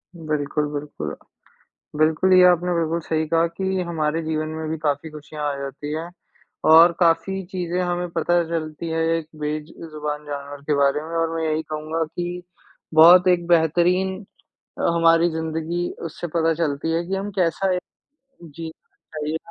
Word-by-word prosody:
बिल्कुल, 150 -2 -2
बिल्कुल। 145 - -5 0.8
बिल्कुल 160 +4 +3
ये 185 0 +8
आपने 180 0 +2
बिल्कुल 165 0 0
सही 160 0 -1
कहा 165 +1 +3
कि 190 +2 -2
हमारे 160 0 -1
जीवन 155 0 -2
में 160 0 -5
भी 160 - -1
काफ़ी 150 +1 -2
खुशियाँ 150 0 -8
आ - - -5
जाती 140 +2 -6
हैं। 165 +2 -4 0.6
और 165 +2 +8
काफ़ी 170 +3 +2
चीज़ें 180 -1 -2
हमें 175 0 -2
पता 175 +1 +1
चलती 160 0 -4
है 165 0 -1 0.2
एक 160 -2 -5
बेज 150 +1 -3 0.2
जुबान 150 0 -4
जानवर 140 0 -7
के 150 - +2
बारे 140 +1 +2
में। 165 +1 -5
और 165 0 0
मैं 165 - -2
यही 155 0 0
कहूँगा 155 +1 -3
कि 175 +2 -5 0.5
बहुत 175 +3 +8
एक 175 -1 +2
बेहतरीन 175 +3 +3 0.7
हमारी 165 0 +4
अ, - - -5
ज़िंदगी 160 +2 -2 0.2
उससे 170 +2 -6
पता 165 0 +2
चलती 160 0 -1
है 170 +1 0
कि 195 - -2
हम 200 +2 -3
कैसा 185 +2 +1
एक 180 - -2 0.6
जीना 160 +1 -9 0.4
चाहिए 155 +2 -2
165 Hz, 165 wpm, -22 LUFS, 155-175 Hz, 0.8 s, ये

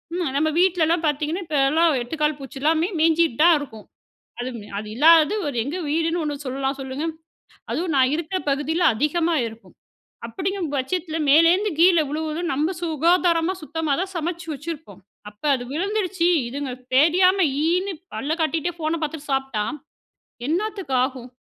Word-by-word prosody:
ம் 345 -7 -1
நம்ம 315 +2 +2
வீட்லலாம் 340 -2 +2
பாத்தீங்கன்னா, 305 +5 -1
இப்போலாம் 310 +3 +3
8 245 +7 -6
கால் 300 -1 +1
பூச்சி 270 0 -9
எல்லாமே 320 +4 +2
மேஞ்சிட்டு 325 -5 +3
தான் 340 -1 +7
இருக்கும், 225 -7 -9 0.6
அது, 255 +1 -3 0.3
அது 210 0 -6
இல்லாதது 320 - +6
ஒரு 260 - -5
எங்க 300 +6 -4
வீடுன்னு 330 +2 0
ஒண்ணு 290 -1 -4
சொல்லலாம், 270 +1 -2
சொல்லுங்க? 270 +4 -4 0.7
அதுவும் 335 -2 -1
நான் 260 +2 +3
இருக்கிற 340 +3 -3
பகுதியில 310 +5 0
அதிகமா 325 +5 +1
இருக்கும். 225 +1 -13 0.5
அப்பிடிங்கிற 385 -1 -3
பட்சத்தில 320 +4 -2
மேலேருந்து 340 +7 +5
கீழே 345 -2 +6
விழுவதும், 315 +3 -3
நம்ம 315 +7 0
சுகாதாரமா 335 +2 +2
சுத்தமா 310 -1 -1
தான் 380 0 -5
சமைச்சி 335 +1 -3
வச்சிருப்போம், 290 - -8 0.3
அப்ப 210 - -29
அது 245 -1 -4
விழுந்துடுச்சு 375 0 0 0.2
இதுங்க 275 +1 -4 0.3
தெரியாம 365 +6 +4 0.2
ஈன்னு 365 +4 +1 0.2
பல்ல 295 +3 -2
காட்டிகிட்டே, 330 +2 -1
ஃபோன 320 0 -2
பாத்துட்டு 295 -1 -6
சாப்பிட்டா, 270 -6 -1 0.8
என்னத்துக்கு 380 -4 -2
ஆகும்? 255 -2 -9
320 Hz, 145 wpm, -23 LUFS, 280-345 Hz, 0.8 s, தான்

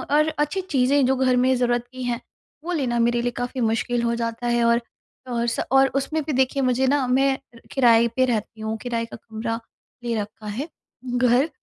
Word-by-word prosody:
और 305 +1 +4
अच्छी 300 +6 0
चीज़ें 280 -5 +2
जो 265 - +3
घर 255 -1 +3
में 260 +1 +3
ज़रूरत 240 -1 0
की 255 -1 -7
हैं 240 -1 -2 0.4
वो 350 - -4
लेना 250 -6 0
मेरे 235 0 +2
लिए 245 0 -1
काफ़ी 245 +1 -3
मुश्किल 235 +1 0
हो 235 0 +1
जाता 230 +1 -3
है 240 0 +2
और, 235 +1 +3 0.5
और 235 -1 -1
स 235 - -1
और 270 0 +6
उसमें 300 +3 -1
भी 305 - -3
देखिए 265 +1 +1
मुझे 255 +1 +2
ना 280 -1 +2
मैं 270 +1 +3 0.4
किराए 235 -3 +5
पे 260 - +3
रहती 220 -2 -2
हूँ 220 0 -2
किराए 235 -2 -2
का 230 - -10
कमरा 225 +1 -4 0.4
ले 235 -1 -1
रखा 210 +1 -9
है 245 +10 -4 0.4
घर, 245 +3 +2
245 Hz, 200 wpm, -23 LUFS, 235-265 Hz, 0.5 s, और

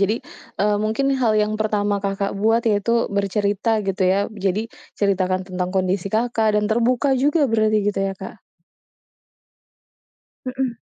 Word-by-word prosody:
Jadi, 200 +2 +2 0.5
eee, 210 0 +2
mungkin 220 +6 0
hal 230 -3 +3
yang 210 - -1
pertama 205 -1 0
Kakak 195 0 -1
buat, 225 +2 +3
yaitu 225 +3 +1
bercerita 205 +2 0
gitu 195 -1 -2
ya? 190 +2 +3 0.3
Jadi 210 +4 0 0.2
ceritakan 185 -2 0
tentang 180 0 -2
kondisi 185 0 0
Kakak 220 -1 +1
dan 210 - +2
terbuka 245 +4 +2
juga 295 +4 +2
berarti 215 -1 +2
gitu, 200 -1 -2
ya, 195 - -4
Kak? - - -9 2.1
Mhm. 255 -2 -2
210 Hz, 140 wpm, -21 LUFS, 195-230 Hz, 2.1 s, hal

